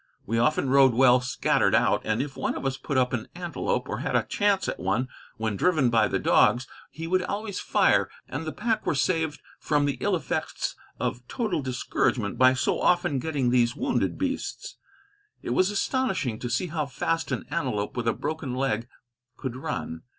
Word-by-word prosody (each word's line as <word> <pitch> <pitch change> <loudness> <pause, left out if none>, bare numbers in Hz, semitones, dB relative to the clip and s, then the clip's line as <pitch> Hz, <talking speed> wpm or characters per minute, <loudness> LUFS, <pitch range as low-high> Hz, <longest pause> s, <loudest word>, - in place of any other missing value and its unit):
We 115 +2 0
often 130 +1 +2
rode 135 -3 +6
well 125 0 +6
scattered 125 0 +2
out, - - +3
and 110 +4 0
if 140 -2 -8
one 130 - -2
of - - -5
us 135 0 0
put 135 +1 -3
up 125 -1 +2
an 110 -3 -2
antelope, 175 -1 -2
or - - -3
had - - -2
a - - +3
chance 205 -2 +1
at - - -3
one 95 +9 0 0.3
when 110 -2 -1
driven 155 - +2
by 110 -2 +4
the - - 0
dogs, 125 +2 +3 0.2
he 160 - -7
would 185 +2 +2
always 200 +2 -3
fire, - - +3 0.2
and 145 +4 -4
the 160 - -4
pack 225 +4 -1
were - - +2
saved 160 0 0 0.2
from 145 -1 +1
the 140 -3 -2
ill - - +1
effects - - -3 0.2
of 125 0 -3
total 215 - -1
discouragement 125 -4 -1
by 130 0 +6
so 130 - 0
often 175 -6 +2
getting 140 -4 0
these 120 -1 +3
wounded 275 - 0
beasts. - - -4 0.7
It - - -3
was 185 +1 +3
astonishing 195 - -1
to 120 - -4
see 120 +9 0
how 155 -3 -2
fast 165 +4 -2
an - - -2
antelope 115 -10 -2
with 120 -2 -2
a 115 - +3
broken 145 -5 -4
leg 125 -3 -1 0.5
could 130 -3 -5
run. 80 - -4
135 Hz, 190 wpm, -26 LUFS, 120-165 Hz, 0.7 s, rode